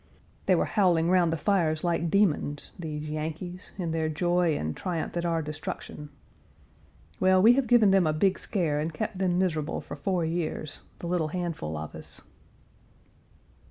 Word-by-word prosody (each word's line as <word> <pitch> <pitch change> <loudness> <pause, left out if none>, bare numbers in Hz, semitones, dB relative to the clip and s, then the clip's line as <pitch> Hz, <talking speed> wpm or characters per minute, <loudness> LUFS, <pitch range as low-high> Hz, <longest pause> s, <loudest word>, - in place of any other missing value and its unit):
They - - +5
were - - +2
howling 175 -5 +2
round 180 -3 +4
the 165 - 0
fires 160 -4 +1
like 170 -1 0
demons, 155 -7 +1
these 155 -2 -5
Yankees 160 +4 -5
in 175 -4 -2
their 160 -1 0
joy 175 0 +1
and 80 0 -3
triumph 175 -3 -3
at 170 0 -1
our 165 -1 0
destruction. 150 0 -6 1.1
Well, 185 0 +5
we 225 +6 +7
have 265 -1 +1
given 220 -4 +5
them 190 -4 +4
a - - +3
big 185 +5 +2
scare 160 -7 0
and 155 +2 -2
kept 160 +4 -4
them 180 -2 +1
miserable 165 -5 0
for - - -8
four 185 -4 -1
years 160 -2 -3
the - - -8
little 170 -3 0
handful 160 - -3
of 75 0 -6
us. - - -9
170 Hz, 165 wpm, -28 LUFS, 155-185 Hz, 1.1 s, we